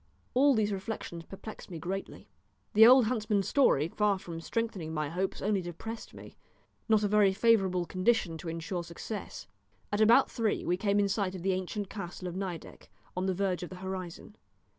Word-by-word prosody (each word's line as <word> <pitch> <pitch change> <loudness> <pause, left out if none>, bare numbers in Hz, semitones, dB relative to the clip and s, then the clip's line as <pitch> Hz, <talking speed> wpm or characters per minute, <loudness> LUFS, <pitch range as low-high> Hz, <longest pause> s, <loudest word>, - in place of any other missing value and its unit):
All 275 +2 +5
these 210 -1 +1
reflections 190 -4 -5
perplexed 205 +2 -10
me 175 - -6
greatly. 190 +4 -5 0.5
The 220 +2 +9
old 255 -1 +8
huntsman's 215 -4 0
story, 160 - +3
far 210 +1 +1
from 170 -3 -7
strengthening 185 -6 -3
my 155 -1 -1
hopes, 185 +4 -3
only 200 -1 +1
depressed 185 +6 -7
me - - -12 0.5
not 215 -1 +4
a - - +3
very 205 -1 +4
favourable 195 -5 +3
condition 185 -1 +1
to 170 - -6
insure 165 +2 -4
success. 170 - -7 0.5
At 205 +1 +1
about 230 +5 +6
three 225 -3 -1
we 175 - +2
came 200 +2 +1
in 200 - +3
sight 195 -2 -1
of 175 - -7
the 190 0 +2
ancient 190 +2 -3
castle 185 -2 -6
of 175 - -5
Nideck 185 -3 -6 0.3
on 185 +1 -1
the 190 - 0
verge 190 -1 0
of 180 - -6
the 185 - -8
horizon. 185 +1 -7
195 Hz, 185 wpm, -30 LUFS, 180-215 Hz, 0.5 s, The